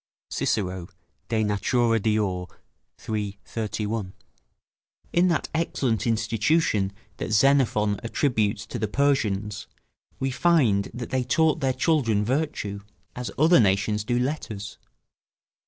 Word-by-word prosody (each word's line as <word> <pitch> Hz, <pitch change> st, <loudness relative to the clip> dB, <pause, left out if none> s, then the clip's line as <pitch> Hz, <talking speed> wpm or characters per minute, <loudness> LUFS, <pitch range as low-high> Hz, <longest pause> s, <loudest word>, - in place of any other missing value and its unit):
Cicero, 90 Hz, -3 st, -1 dB, 0.4 s
De 110 Hz, -2 st, +1 dB
Natura 115 Hz, +3 st, +2 dB
Deor., 100 Hz, -4 st, 0 dB, 0.6 s
iii., 105 Hz, -2 st, -2 dB
31.] 105 Hz, -3 st, -3 dB, 1.0 s
In 175 Hz, +2 st, +4 dB
that 170 Hz, -3 st, 0 dB
excellent 135 Hz, -9 st, 0 dB
institution 115 Hz, -1 st, +1 dB, 0.3 s
that -, -, -4 dB
Xenophon 110 Hz, -4 st, +3 dB
attributes 115 Hz, -3 st, 0 dB
to -, -, -6 dB
the 110 Hz, -, 0 dB
Persians, 110 Hz, -5 st, 0 dB, 0.5 s
we 135 Hz, 0 st, -1 dB
find 125 Hz, -11 st, +3 dB
that 120 Hz, -1 st, -7 dB
they 130 Hz, -1 st, +1 dB
taught 160 Hz, +5 st, +2 dB
their 135 Hz, -3 st, +1 dB
children 125 Hz, -9 st, +1 dB
virtue, 125 Hz, -6 st, -2 dB, 0.4 s
as 125 Hz, -1 st, -4 dB
other 160 Hz, +3 st, +6 dB
nations 105 Hz, 0 st, +2 dB
do 120 Hz, +3 st, 0 dB
letters. 125 Hz, -6 st, -3 dB
115 Hz, 110 wpm, -25 LUFS, 105-135 Hz, 1.0 s, other